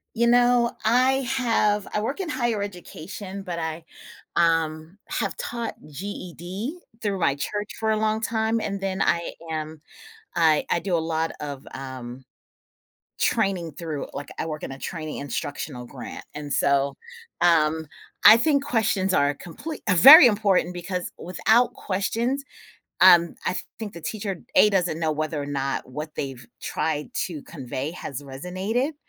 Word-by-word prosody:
You 235 +1 +3
know, 245 0 +4
I 255 +4 +4 0.2
have 210 -5 +2
I 210 - 0
work 270 - -3
in 360 -3 -3
higher 240 -6 0
education, 195 +1 -7
but 175 -3 -4
I, 160 0 -4 0.5
um, 165 +1 +1
have - - -2
taught 240 - -4
GED 185 - -6 0.2
through 200 -3 -1
my 140 -5 +2
church 205 +8 -3
for 220 0 +1
a 215 - +2
long 215 0 +1
time 225 0 0
and 200 -2 -3
then 190 -1 -2
I 170 0 0 0.2
am 155 -1 -5 0.5
I 160 -3 +4
I - - +2
do 175 +1 -1
a - - +3
lot 160 0 -1
of, 145 -2 -6
um, 130 -1 -7 1.0
training 195 -8 +1
through 155 -3 -5
like, 145 - -6
I - - -1
work 155 -1 -5
in - - -6
a 135 - -8
training 155 0 -5
instructional 140 -2 -5
grant, - - -8
and 145 -1 -5
so, 140 0 +2 0.4
um, 160 -2 +3 0.4
I 215 - +11
think 280 +3 +2
questions 215 -8 +1
are 145 0 +3
comple 295 - -7 0.2
very 270 - +11
important 200 -5 +2
because 180 +1 -4
without 220 +7 +2
questions, 230 +8 -1 0.6
um, 170 -1 +7
I - - 0 0.2
think 215 -2 -6
the 170 - -9
teacher, 200 +2 -4 0.2
A, 210 - +7
doesn't 180 -4 +1
know 160 -2 +1
whether 155 0 -2
or - - -4
not 135 -2 -2
what 150 +4 -6
they've 135 -3 -5 0.2
tried 150 -1 -2
to 160 -5 -7
convey 135 -1 -5
has 145 -6 -6
resonated, 185 - -2
175 Hz, 155 wpm, -25 LUFS, 155-220 Hz, 1.0 s, I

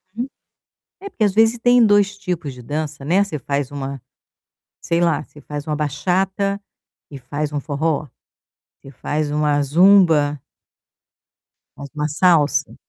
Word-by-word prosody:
Uhum. 245 +3 -3 0.7
É 400 - -7
porque, 225 - -2
às 205 - +2
vezes, 225 +3 +3
tem 245 0 +5
2 205 -1 +3
tipos 175 -8 -4
de 125 - -12
dança, 145 +2 -5
né? 185 +7 +3
Você 155 -8 -5
faz 140 +1 -3
uma 135 -2 -6 0.8
sei 170 0 0
lá, 165 -3 +1
você 150 - -17
faz 145 -1 -7
uma 150 -1 -2
bachata 190 +7 -1 0.5
e 140 - -8
faz 145 +4 -4
um 145 - -2
forró. 150 +1 -2 0.7
Você 135 - -13
faz 150 +3 -3
uma 150 -1 +1
zumba 155 -2 +4 1.4
faz 140 - -9
uma 150 0 -2
salsa. 155 -1 +2
150 Hz, 145 wpm, -20 LUFS, 145-190 Hz, 1.4 s, tem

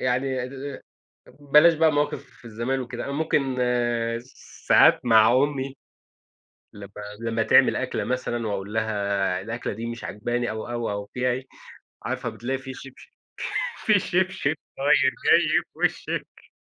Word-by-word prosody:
يعني 130 0 -1 0.9
بلاش 150 +4 +6
بقى 160 0 +3
مواقف 140 -4 -3
زمان 120 +4 -2
وكده. 120 -1 -5
أنا 140 - -4
ممكن 140 -3 0 1.1
ساعات - - +6
مع 110 -1 +6
أمي، 135 0 0 1.0
لمّا 100 -1 -11 0.3
لمّا 115 0 -1
تعمل - - +5
أكلة - - -2
مثلًا 120 -2 -2
وأقول 100 0 -4
لها 100 -4 0
الأكلة 115 +4 -4
دي 115 +3 -6
مش 115 0 -6
عاجباني 120 +4 -2
أو، 110 +1 -5
أو، 120 -2 -2
أو 100 0 -4
فيها 125 0 +1
إيه، 130 +2 -3 0.6
عارفة - - -3
بتلاقي 130 +3 -3
فيه 135 -1 -8
شبشب، 135 - -13 0.8
فيه 210 -2 +5
شبشب 180 -5 0 0.2
طاير 140 -1 +3 0.2
جاي - - +5
في - - -25
وشِك - - -3
125 Hz, 135 wpm, -25 LUFS, 110-135 Hz, 1.1 s, بلاش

